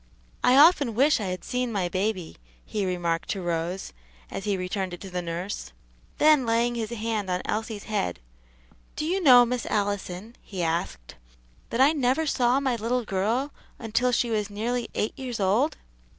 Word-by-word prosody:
"I 250 +1 +5
often 290 -6 +6
wish 280 +4 +4
I 210 - -3
had 185 0 -4
seen 250 -1 -2
my 195 -5 0
baby," 185 -1 -2 0.3
he 205 -3 -2
remarked 170 -2 -1
to 195 - -2
Rose, 170 - -3 0.4
as 195 - -5
he 200 -2 0
returned 185 0 -3
it - - -18
to 195 - -8
the 180 0 -2
nurse. 170 - -5 0.4
Then 300 -3 +5
laying 235 +1 +1
his 225 -2 -3
hand 220 -3 -2
on 180 0 -1
Elsie's 220 -1 -3
head, 150 - -2 0.8
"Do 305 - -2
you 370 +4 0
know, 250 -6 +8
Miss 245 0 -3
Allison," 205 +1 -2
he 185 -4 -5
asked, 160 - -2 0.6
"that 235 - 0
I 275 +3 +7
never 280 +1 +1
saw 255 -2 +2
my 265 -3 0
little 235 +2 -1
girl 225 +9 -1 0.2
until 240 +2 0
she 240 -1 +1
was 210 -2 0
nearly 230 +4 -2
eight 215 - -1
years 250 -4 -4
old?" 215 +11 +2
220 Hz, 175 wpm, -26 LUFS, 185-250 Hz, 0.8 s, know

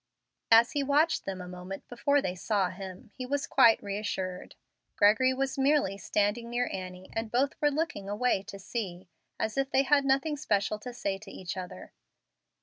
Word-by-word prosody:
As 230 +1 +7
he 290 - 0
watched 290 +4 +2
them 190 -1 -4
a 180 - -8
moment 180 +2 -8
before 280 +4 +1
they 180 - -1
saw 190 0 0
him, 195 +3 -9
he 255 - -6
was 280 +2 -1
quite 230 -4 +5
reassured. 195 -2 -4 0.4
Gregory 220 +6 +5
was 270 +1 -2
merely 275 -7 +3
standing 205 +4 -1
near 245 +1 0
Annie, 185 0 -7
and 225 -1 -3
both 270 +3 +2
were 295 - +4
looking 290 -10 -2
away 210 0 +1
to 195 - -7
sea, 190 -3 -5 0.3
as 220 +5 -1
if 270 0 0
they 270 - +3
had 280 +1 +4
nothing 275 +3 +1
special 210 -7 0
to 250 +3 -7
say 200 -5 -3
to 205 -1 -12
each 185 -2 -6
other. 180 - -8
220 Hz, 180 wpm, -29 LUFS, 195-270 Hz, 0.4 s, As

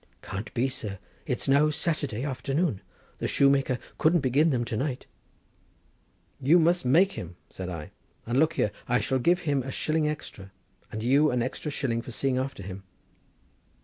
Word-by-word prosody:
"Can't 100 +3 -5
be, 125 +3 +2
sir; 105 -6 -5 0.3
it's - - -2
now 140 +3 +5
Saturday 145 - -2
afternoon, 145 +4 0
and 105 - -4 0.4
the - - -1
shoemaker 140 -2 +3 0.2
couldn't 165 +1 +4
begin 140 +5 +3
them 125 -5 0
to 115 - -3
night!" 130 +2 -2 1.3
"But 130 - -4
you 170 - +8
must 175 +1 +3
make 175 +10 +5
him!" 90 - -7 0.2
said 95 -1 -6
I; 80 -4 -6 0.3
"and 120 +3 +1
look 160 +1 +3
here, 105 - +1 0.2
I 125 - +3
shall 130 +5 0
give 175 +7 +3
him 145 -5 +1
a 130 - -6
shilling 155 +3 0
extra, 100 -10 -7 0.4
and 110 0 -4
you 140 +5 +4
an 125 -2 +1
extra 130 +4 -4
shilling 120 -5 -1
for 120 - -10
seeing 130 +2 0
after 130 -6 -4
him." 95 +1 -7
135 Hz, 180 wpm, -27 LUFS, 115-150 Hz, 1.3 s, you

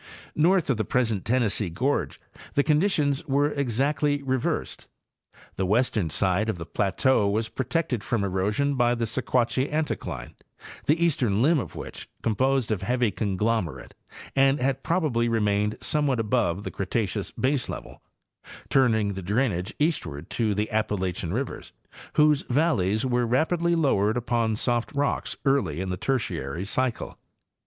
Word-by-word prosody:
North 170 0 +3
of 125 - 0
the 110 - 0
present 110 -4 0
Tennessee 115 -5 +1
gorge 130 - -1 0.4
the 145 - +4
conditions 150 -3 +2
were 145 +2 +2
exactly 140 +2 0
reversed. 130 -2 -2 0.7
The 95 - 0
western 105 -4 +1
side 95 +6 +1
of 110 - -1
the 85 - -6
plateau 105 +2 +1
was 110 +2 -1
protected 130 -4 -1
from 115 -4 -1
erosion 105 +9 0
by 120 -2 +2
the 115 -1 -1
Sequatchie 125 +3 0
anticline, 155 0 -3 0.5
the 155 +4 +3
eastern 120 -9 +1
limb 160 +2 +4
of - - -6
which, - - -8
composed 130 +1 +1
of 105 -3 -1
heavy 120 +2 +1
conglomerate, 100 - -2 0.4
had 135 -1 +2
probably 145 -10 +1
remained 105 -2 +1
some 150 -1 +1
what 130 -4 +1
above 105 -5 0
the - - -5
Cretaceous 100 0 -2
baselevel, 130 0 -2 0.7
turning 110 -6 +3
the 95 -1 -4
drainage 100 -1 0
east 150 - 0
ward 70 +1 -8
to 110 -4 0
the 105 +2 -1
Appalachian 95 -5 -1
rivers, 125 +6 -4 0.4
whose 150 -1 +4
valleys 120 - +2
were 125 -2 +1
rapidly 170 +7 +2
lowered 110 -9 +2
upon 115 -2 0
soft 120 +1 0
rocks 140 0 -1
early 100 - +1
in 95 0 -3
the 90 - -1
Tertiary 90 - -2
cycle. 125 +3 -2
120 Hz, 140 wpm, -26 LUFS, 105-140 Hz, 0.7 s, the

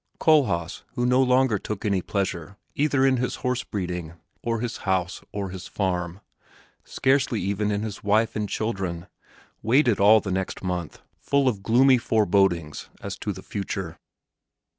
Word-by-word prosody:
Kohlhaas, 125 - +2
who 120 - 0
no 125 +1 +4
longer 130 -4 +3
took 105 +1 -5
any 100 -3 +1
pleasure 95 -1 -3 0.2
either 145 -2 +2
in 130 -1 +3
his 125 0 -1
horse 125 -1 0
breeding, 90 -7 -4 0.3
or 115 -1 -1
his 120 0 -3
house 95 -2 -1
or 100 -2 -4
his 95 -1 -8
farm, 90 -1 -2 0.6
scarcely 130 -4 +1
even 100 +3 -1
in 105 0 -1
his 105 -2 -6
wife 110 +2 +2
and 105 -2 -2
children, 95 -6 -3 0.6
waited 120 0 +3
all 105 +2 +7
the 100 - -5
next 95 +1 -3
month, 90 -3 -4 0.2
full 140 -1 +1
of 105 -6 0
gloomy 125 +4 +5
forebodings 95 -8 +1
as - - -5
to - - -3
the - - -8
future. 95 -4 -5
105 Hz, 155 wpm, -25 LUFS, 95-125 Hz, 0.6 s, all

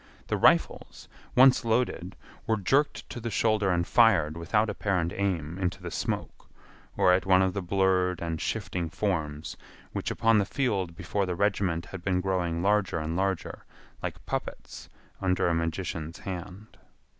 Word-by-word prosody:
The - - +1
rifles, - - +2 0.3
once 130 +1 +6
loaded, 110 -6 -1 0.3
were 110 - +2
jerked 135 +9 +1
to - - -5
the 115 0 -4
shoulder 105 0 +1
and 85 -1 +1
fired 95 -11 +4
without 105 +7 +1
apparent 95 -5 -1
aim 90 -4 -2
into 90 -1 -1
the - - -7
smoke - - -4 0.5
or 90 - +5
at 95 +1 +1
one 95 0 +5
of 95 -1 0
the 100 - -2
blurred 90 -1 +1
and 80 -2 -3
shifting 85 -2 -2
forms 80 -7 -2 0.4
which - - -3
upon 115 -1 +3
the - - +3
field 100 -11 -1
before 95 +2 -2
the 90 - -2
regiment 95 -4 0
had 95 -1 -8
been 90 0 0
growing 90 -3 -1
larger 100 -3 +2
and 80 +1 -3
larger 95 -1 -2 0.4
like - - -6
puppets - - -5 0.3
under 95 -1 +1
a 85 - +2
magician's 85 0 -3
hand. 95 +3 -8
95 Hz, 155 wpm, -28 LUFS, 85-100 Hz, 0.5 s, once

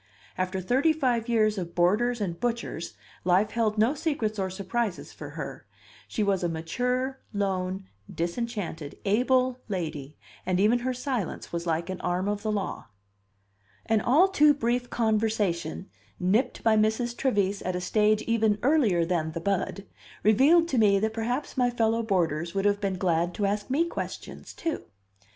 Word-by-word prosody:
After 185 +1 -2
thirty 265 - +3
five 245 -6 0
years 215 -3 +2
of 170 -2 -6
boarders 215 +8 +2
and 175 -5 -3
butchers, 235 -8 -3 0.3
life 185 +4 +3
held 220 -2 0
no 225 +6 +3
secrets 275 -9 -2
or 190 -1 0
surprises 195 +2 -3
for - - -8
her; - - -6 0.4
she 215 - -1
was 195 -3 +1
a 175 - +1
mature, 250 +11 -2
lone, 190 -1 -1 0.3
disenchanted, 170 -4 -4
able 255 +4 +2
lady, 155 -7 -4 0.3
and 185 0 0
even 220 +5 +4
her 255 +1 -1
silence 250 - -3
was 170 0 -3
like 165 +1 0
an 185 - -6
arm 180 +2 -1
of 205 0 -1
the 215 0 -1
law. 205 -2 -3 1.0
An 220 -1 +2
all 305 +10 +5
too 300 -6 +5
brief 245 -1 -1
conversation, 215 - 0 0.3
nipped 215 +8 +1
by 225 -1 +4
Mrs. 220 +3 +1
Trevise 205 -6 0
at 185 0 -2
a - - -1
stage 215 +3 +2
even 220 -2 +2
earlier 240 - +3
than 165 -2 -1
the 165 - -3
bud, 200 +2 -2 0.4
revealed 285 +11 +5
to 260 - +1
me 205 -2 +5
that 220 +2 -1
perhaps 245 +6 -3
my 250 -1 +3
fellow 230 -1 +1
boarders 170 -5 0
would 195 0 0
have 205 0 +2
been 195 -2 -1
glad 175 -1 0
to 205 - 0
ask 205 +2 -1
me 295 +6 +2
questions, 340 - -7
too. 330 - -3
210 Hz, 165 wpm, -27 LUFS, 185-240 Hz, 1.0 s, all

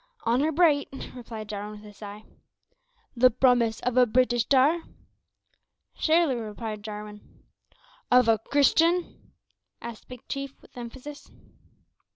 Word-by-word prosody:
"Honour 255 +7 +2
bright," 305 -3 +3 0.2
replied 225 -4 -8
Jarwin 210 0 -6
with 210 - -15
a 205 - -13
sigh. 205 +1 -10 0.9
"The 255 +1 +6
promise 245 -2 +2
of 250 0 -1
a 250 -1 +6
Breetish 240 0 +2
tar?" 285 +5 +4 1.1
"Surely," 320 -3 +2
replied 215 -1 -6
Jarwin. 210 0 -8 0.9
"Of 250 -1 +5
a 225 -1 +4
Christian?" 330 +7 +1 0.5
said 235 -2 -8
Big 250 -1 -12
Chief, 275 -1 -5
with - - -22
emphasis. 255 +4 -9
245 Hz, 120 wpm, -26 LUFS, 215-275 Hz, 1.1 s, The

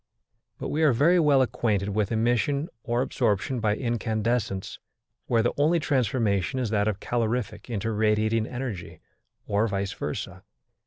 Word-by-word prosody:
But - - -5
we 155 - -1
are 150 -5 +5
very 165 +9 +4
well 145 -4 +5
acquainted 105 -5 0
with 105 +1 -1
emission 120 - +1
or 120 +3 0
absorption 120 0 0
by 105 -2 +1
incandescence, 110 -4 -2 0.5
where 115 -2 +2
the 120 - +1
only 160 +4 +3
transformation 115 - 0
is 120 -4 -1
that 105 -1 +1
of 105 -2 -1
calorific 115 -2 -2
into 115 -1 -2
radiating 110 +1 +1
energy, 120 -8 -6 0.5
or 105 +2 +1
vice 100 -2 -2
versa. - - -5
115 Hz, 145 wpm, -26 LUFS, 105-125 Hz, 0.5 s, are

